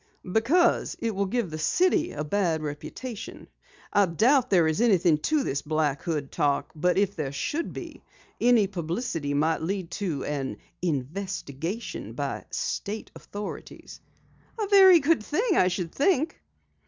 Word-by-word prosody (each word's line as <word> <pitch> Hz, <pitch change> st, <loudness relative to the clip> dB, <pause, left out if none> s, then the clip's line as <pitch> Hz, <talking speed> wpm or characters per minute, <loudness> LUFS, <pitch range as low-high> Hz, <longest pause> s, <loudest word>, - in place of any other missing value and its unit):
"Because 260 Hz, -, +2 dB
it 230 Hz, -1 st, -2 dB
will 200 Hz, 0 st, -1 dB
give 225 Hz, -4 st, -1 dB
the 155 Hz, -, -5 dB
city 350 Hz, -, +2 dB
a 150 Hz, -, -4 dB
bad 165 Hz, -1 st, 0 dB
reputation. 195 Hz, -, -7 dB, 0.5 s
I 205 Hz, -2 st, +4 dB
doubt 245 Hz, -, +3 dB
there 175 Hz, -5 st, +4 dB
is 160 Hz, +7 st, 0 dB
anything 180 Hz, -9 st, +4 dB
to 295 Hz, -, +1 dB
this 140 Hz, -, -2 dB
Black 150 Hz, -2 st, 0 dB
Hood 150 Hz, -5 st, -3 dB
talk, 145 Hz, -3 st, 0 dB
but 180 Hz, +4 st, +1 dB
if 200 Hz, 0 st, +1 dB
there 145 Hz, -4 st, -3 dB
should 295 Hz, -, -2 dB
be, -, -, -8 dB, 0.4 s
any 240 Hz, -3 st, +5 dB
publicity 170 Hz, -, -3 dB
might 160 Hz, +3 st, +1 dB
lead 185 Hz, +1 st, -3 dB
to 170 Hz, -9 st, -3 dB
an 135 Hz, -7 st, -3 dB, 0.2 s
investigation 170 Hz, -, -4 dB
by -, -, -4 dB
state 210 Hz, +2 st, -4 dB
authorities." 205 Hz, 0 st, -8 dB, 0.6 s
"A 425 Hz, -, +1 dB
very 380 Hz, -3 st, +8 dB
good 315 Hz, -2 st, +3 dB
thing, 390 Hz, -, 0 dB
I 180 Hz, -, +4 dB
should 180 Hz, -2 st, -2 dB
think." 310 Hz, +1 st, +1 dB
185 Hz, 145 wpm, -26 LUFS, 155-240 Hz, 0.6 s, very